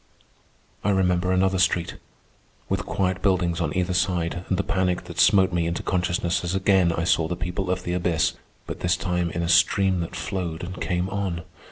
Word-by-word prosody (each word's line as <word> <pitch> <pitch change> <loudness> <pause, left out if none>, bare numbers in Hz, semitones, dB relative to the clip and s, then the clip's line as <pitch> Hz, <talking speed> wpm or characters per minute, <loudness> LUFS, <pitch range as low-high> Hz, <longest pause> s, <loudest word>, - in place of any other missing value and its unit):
I 100 - +1
remember 90 -2 +2
another 95 0 +2
street, 85 -1 +1 0.7
with - - -2
quiet 95 -1 -1
buildings 90 -3 +1
on 75 -3 -1
either 90 0 0
side, 90 -1 0
and 95 - +1
the 100 - 0
panic 95 -2 0
that - - -8
smote 95 -2 +5
me 85 -1 +1
into 85 - -3
consciousness 90 -1 0
as 90 +2 -2
again 95 -2 +3
I 85 0 -1
saw 85 -1 +2
the 90 - -3
people 90 +2 -3
of 90 0 -1
the 90 - -3
abyss, 85 -2 +1 0.3
but - - -6
this 90 0 +1
time 90 -2 -1
in 85 +1 -3
a - - -1
stream 95 +2 +3
that 85 - -4
flowed 90 -4 -4
and 95 +1 -7
came 90 +1 -1
on. 95 -4 -3
90 Hz, 195 wpm, -24 LUFS, 85-95 Hz, 0.7 s, smote